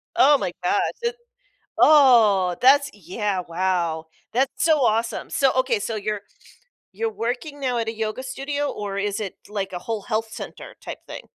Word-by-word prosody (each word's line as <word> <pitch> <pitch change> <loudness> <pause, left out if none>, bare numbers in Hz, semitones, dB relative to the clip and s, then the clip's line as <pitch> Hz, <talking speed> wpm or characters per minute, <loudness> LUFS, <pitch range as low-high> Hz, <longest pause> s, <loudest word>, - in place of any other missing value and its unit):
Oh 295 -5 +6
my 190 -8 -2
gosh, 180 +3 +2 0.2
and 470 0 0 0.6
oh! 225 - +6
That's 280 +2 +6
yeah, 200 +1 -3
wow. 170 -2 -1 0.3
That's 260 +3 0
so 315 -2 +4
awesome. 225 +1 0
So, 270 -2 +3
okay. 255 -4 +2
So 220 +2 -3
you're 210 0 -3 0.7
you're 220 +3 -2
working 245 - -4
now 255 -3 -1
at 230 -1 -1
a 225 - -2
yoga 220 +3 -3
studio 280 +2 -3
or 200 -1 -5
is 200 0 -1
it 205 -4 -5
like 200 -2 -3
a 180 - -3
whole 220 +1 -4
health 220 +1 -2
center 230 - -9
type - - -7
thing? - - -7
220 Hz, 170 wpm, -23 LUFS, 200-260 Hz, 0.7 s, Oh